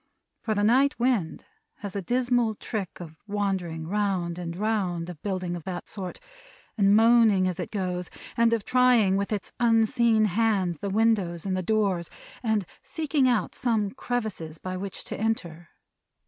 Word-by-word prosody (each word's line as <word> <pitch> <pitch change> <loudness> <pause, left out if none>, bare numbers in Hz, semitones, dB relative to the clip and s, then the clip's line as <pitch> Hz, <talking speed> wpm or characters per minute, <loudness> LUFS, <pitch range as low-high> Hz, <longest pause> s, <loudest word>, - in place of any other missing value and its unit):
For 220 -2 -1
the 205 - +1
night 265 +6 +4
wind 235 -9 0 0.4
has 205 -2 -6
a 200 - -1
dismal 245 +1 +1
trick 205 -4 -5
of 160 -3 -10
wandering 190 -6 -2
round 185 -3 -1
and 170 -1 -5
round 185 -4 -1
a - - -6
building 180 +1 -3
of 170 - -7
that 180 -2 -5
sort, 190 -4 -6 0.6
and 200 -1 +4
moaning 225 -4 +5
as 180 0 -3
it 180 - -3
goes; 180 -3 -3 0.3
and 230 0 +3
of 230 -3 +1
trying 250 -6 +4
with 200 +2 -1
its 210 -2 -3
unseen 225 -1 +3
hand, 195 -5 +1
the 200 - -2
windows 200 -5 +1
and 190 -1 0
the 185 - -1
doors; 190 -3 0 0.3
and 220 -5 0 0.2
seeking 275 0 0
out 230 -8 +1
some 220 -5 0
crevices 220 -11 -4
by 185 +3 -5
which 195 +1 -5
to - - -5
enter. 175 -7 -2
205 Hz, 160 wpm, -26 LUFS, 180-225 Hz, 0.6 s, moaning